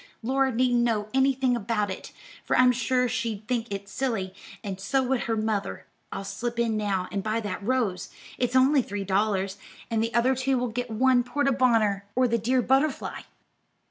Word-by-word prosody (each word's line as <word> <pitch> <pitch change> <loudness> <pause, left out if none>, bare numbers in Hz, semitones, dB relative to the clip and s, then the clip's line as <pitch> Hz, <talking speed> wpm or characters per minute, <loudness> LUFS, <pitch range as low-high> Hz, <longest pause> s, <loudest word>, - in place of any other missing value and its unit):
Laura 265 +2 +1
needn't 245 0 +2
know 215 -3 0
anything 265 -1 +2
about 210 -3 -1
it, 190 - -7 0.3
for - - +1
I'm 255 0 +6
sure 250 +1 +1
she'd 225 -3 -3
think 235 -3 -2
it 200 0 -5
silly, 200 -6 -2 0.3
and 195 -3 -5
so 265 +7 +1
would 255 0 0
her 225 -1 -1
mother. 215 -2 -2 0.3
I'll - - -4
slip 235 +4 -4
in 235 -2 +1
now 200 -3 -1
and 200 - -2
buy 215 +3 -1
that 205 -1 -4
rose; 205 -5 -1 0.3
it's 245 0 0
only 265 +2 +5
three 205 -3 -4
dollars, 195 0 0 0.3
and 225 -1 +1
the 230 +1 -1
other 245 +3 +4
two 260 +1 0
will 245 0 -1
get 245 +2 -4
one 250 +2 +3
porte 275 +2 0
bonheur, 220 -6 +3
or 255 0 +3
the 235 0 +1
dear 250 +3 +1
butterfly." 270 +3 +1
235 Hz, 185 wpm, -26 LUFS, 210-255 Hz, 0.3 s, I'm